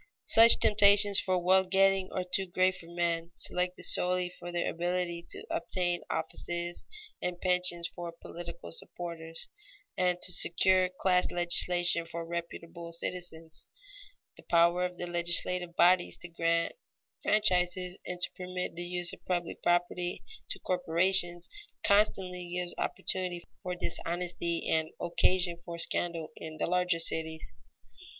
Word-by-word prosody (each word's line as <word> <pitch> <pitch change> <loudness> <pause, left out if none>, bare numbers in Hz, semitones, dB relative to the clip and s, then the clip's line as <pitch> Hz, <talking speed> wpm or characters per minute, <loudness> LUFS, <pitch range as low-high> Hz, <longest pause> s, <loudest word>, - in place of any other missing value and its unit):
Such 230 +1 +8
temptations 205 -1 +6
for 185 -1 0
wealth 185 +1 +3
getting 195 0 +3
are 185 - -2
too 190 +1 -2
great 185 +1 +2
for 170 -2 -13
men 170 -1 -2
selected 180 0 -1
solely 180 0 +1
for 175 0 -9
their 175 0 -1
ability 175 0 -2
to - - -5
obtain 175 0 -1
offices 170 +2 -3 0.3
and 180 -1 -3
pensions 180 -2 +3
for 175 -1 -7
political 170 0 -9
supporters, 165 -1 -7 0.5
and 180 -1 +1
to 180 - +2
secure 185 +2 +3
class 180 0 +1
legislation 175 -1 +1
for 165 0 -6
reputable 170 0 -7
citizens. 165 -2 -5 0.7
The - - -12
power 170 +1 +3
of 180 0 -6
the 175 - -4
legislative 175 0 0
bodies 180 0 +4
to - - -6
grant 170 0 0 0.5
franchises 180 -3 +1
and 180 0 -6
to - - 0
permit 180 -1 -5
the 175 0 -4
use 175 0 -1
of - - -12
public 175 -2 -3
property 175 0 0 0.3
to - - -5
corporations, 175 0 +3 0.4
constantly 185 -4 +1
gives 180 0 -3
opportunity 180 -2 -1 0.2
for 180 -1 -4
dishonesty 170 -1 -3
and 160 0 +1
occasion 175 0 +1
for 170 -1 -7
scandal 170 -1 -2
in 155 -1 -8
the - - -1
larger 180 0 +1
cities. 160 -1 -1
175 Hz, 135 wpm, -30 LUFS, 170-180 Hz, 0.7 s, Such